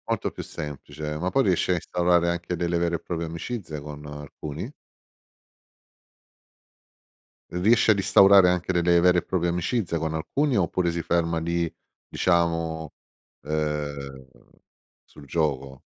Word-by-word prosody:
Molto - - -1
più - - -7
semplice, 75 +1 -6
ma 90 +2 -1
poi 135 +7 +2
riesci 95 -3 +1
a - - +3
instaurare 85 0 +1
anche 85 +1 -2
delle 85 0 -1
vere 85 0 0
e - - -3
proprie 85 -1 -4
amicizie, 85 -1 -5
con 75 0 -9
alcuni? 75 - -7 2.8
Riesci 110 +6 +4
ad 105 - +3
instaurare 95 -1 +6
anche 90 +1 0
delle 85 -1 +3
vere 90 0 +5
e - - +3
proprie 85 -2 0
amicizie 90 +1 -1
con 80 0 -2
alcuni, 135 - 0
oppure 90 -1 +1
si 85 0 -2
ferma 85 0 0
lì, 85 0 -1 0.4
diciamo, 85 -3 0 0.5
ehm, 75 -3 -3 0.8
sul 75 - -15
gioco? 70 -3 -2
85 Hz, 130 wpm, -25 LUFS, 75-90 Hz, 2.8 s, instaurare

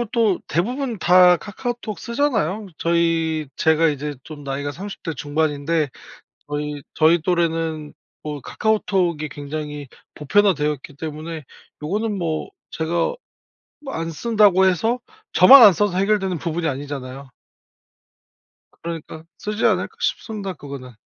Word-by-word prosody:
그리고 - - 0
또 220 -6 +2
대부분 235 - -2
다 180 0 +6
카카오톡 225 +2 -5
쓰잖아요. 220 - -1
저희 165 -2 +1
제가 160 +1 +3
이제 145 0 -3
좀 150 -2 -10
나이가 140 +1 -3
30 195 +5 -8
대 165 - -3
중반인데 150 +1 -1 0.6
저희 145 0 -4
저희 160 +1 +4
또래는 165 -3 -1 0.3
뭐 150 -1 -5
카카오톡이 185 - 0
굉장히 145 0 -6 0.3
보편화되어 150 -1 +2
있기 140 0 -13
때문에 155 +1 -6 0.4
요거는 205 +6 -2
뭐 160 -3 -2 0.2
제가 160 +1 -3 0.9
뭐 275 -2 -7
안 165 0 -3
쓴다고 200 0 +3
해서 220 +7 +1 0.3
저만 275 -1 +9
안 210 -3 +10
써서 200 0 0
해결되는 195 -3 +1
부분이 165 +1 -2
아니잖아요. 135 -1 -6 1.5
그러니까 165 -1 -7
쓰지 210 +1 -3
않을까 185 -5 0
싶습니다 205 -3 -2
그거는. 140 -4 -9
165 Hz, 295 characters per minute, -21 LUFS, 150-205 Hz, 1.5 s, 안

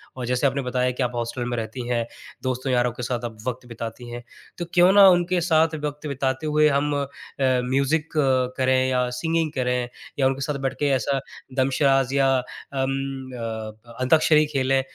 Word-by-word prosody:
और 130 -1 -4
जैसे 125 +3 +2
आपने 135 +1 -1
बताया 125 0 0
कि 125 +1 -2
आप 125 - -1
हॉस्टल 120 +1 -3
में 120 - -2
रहती 115 +2 -5
हैं, 120 -2 0 0.4
दोस्तों 130 +1 -1
यारों 125 0 +2
के 125 - -7
साथ 120 0 -2
आप 110 -2 -6
वक़्त 125 0 -3
बिताती 115 +1 -7
हैं, 120 0 -7 0.3
तो 175 - -3
क्यों 180 +1 +6
ना 200 -1 +9
उनके 175 0 +2
साथ 160 -1 +3
वक़्त 150 +1 -5
बिताते 135 +1 -2
हुए 150 0 +4
हम 145 +1 +1
अ, 140 0 0 0.4
म्यूजिक 135 +4 +1 0.5
करें 130 0 +2
या 125 -1 +1
सिंगिंग 165 +1 0
करें 125 -1 0 0.3
या 135 - +4
उनके 135 +1 -2
साथ 140 0 -2
बैठ - - -3
के 145 - +2
ऐसा 135 +4 0 0.4
दमशराज 135 0 +2
या 135 -1 +3
अम, 135 +1 -4
अ, 110 -1 -7
अंताक्षरी 155 +3 +4
खेलें 135 0 +2
130 Hz, 180 wpm, -24 LUFS, 125-140 Hz, 0.5 s, ना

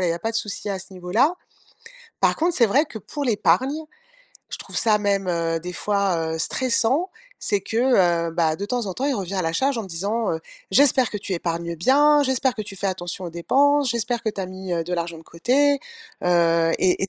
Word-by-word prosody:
voilà, 180 - +1
il - - +1
y - - +2
a 170 - -5
pas 225 - -1
de 225 - -2
souci 210 -1 -4
à 195 - -2
ce 190 +1 -12
niveau-là. 195 - +1 0.8
Par - - +3
contre, 340 +2 0
c'est 235 - +5
vrai 285 +9 +3
que 225 - -8
pour 290 +8 -6
l'épargne, 245 - +1 0.6
je - - -6
trouve - - -11
ça 220 -3 +3
même, 200 -2 0
heu, 165 -1 0
des 180 +1 -7
fois 200 -3 0 0.2
heu, - - -4
stressant, 260 - 0 0.3
c'est 205 -1 0
que, 220 - -5 0.5
heu, - - -4
bah, 160 -2 +1
de 200 - -4
temps 235 +1 -2
en 185 - -4
temps, 260 - -3
il 285 - +1
revient 195 -1 -4
à 185 - 0
la 165 - -1
charge, 270 +9 +1
en - - -2
me 195 - -9
disant, 200 +7 -1
heu: 160 - -3 0.3
«J'espère 260 +2 +4
que 210 - -4
tu 200 - -5
épargnes 170 0 -3
bien, 290 - +4
j'espère 265 -1 +1
que 215 - -4
tu 195 -1 -9
fais 195 +1 -2
attention 180 0 -4
aux 170 - -6
dépenses, 280 - +2
j'espère 235 0 -1
que 220 - -1
tu 205 - -6
as 190 - -3
mis, 185 0 -6
heu, 165 -1 -1
de 180 +2 -3
l'argent 170 -1 -3
de - - -13
côté», 280 +11 +2 0.5
heu, 170 -1 +3
et 185 0 +2
et 195 - 0
200 Hz, 240 wpm, -23 LUFS, 175-255 Hz, 0.8 s, c'est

